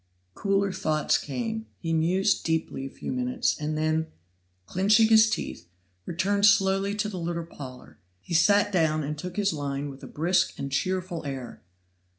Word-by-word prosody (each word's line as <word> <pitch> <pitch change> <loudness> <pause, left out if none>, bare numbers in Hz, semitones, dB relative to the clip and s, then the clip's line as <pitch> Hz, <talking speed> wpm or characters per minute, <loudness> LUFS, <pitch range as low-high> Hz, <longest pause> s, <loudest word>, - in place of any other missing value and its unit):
Cooler 195 - +1
thoughts 155 -4 +1
came. 225 - -4
He 165 -1 -3
mused 180 +5 +2
deeply 160 -4 -2
a - - -9
few - - -6
minutes, 125 -1 0
and 155 0 -2
then, 155 +1 0 0.6
clinching 210 - +4
his 220 0 +7
teeth, 85 - -4 0.4
returned 200 +4 +2
slowly 195 0 +3
to 210 0 -1
the 195 -4 -5
little 170 0 -3
parlor: 130 -8 -11 0.2
he 170 - -8
sat 205 +5 +4
down 160 -4 +2
and 150 +2 -3
took 180 +4 -7
his 200 -3 +1
line 140 -1 -3
with 135 - -13
a - - -8
brisk 175 +5 +1
and 140 0 -5
cheerful 185 +3 -2
air. 135 -4 -6
170 Hz, 160 wpm, -27 LUFS, 150-200 Hz, 0.6 s, his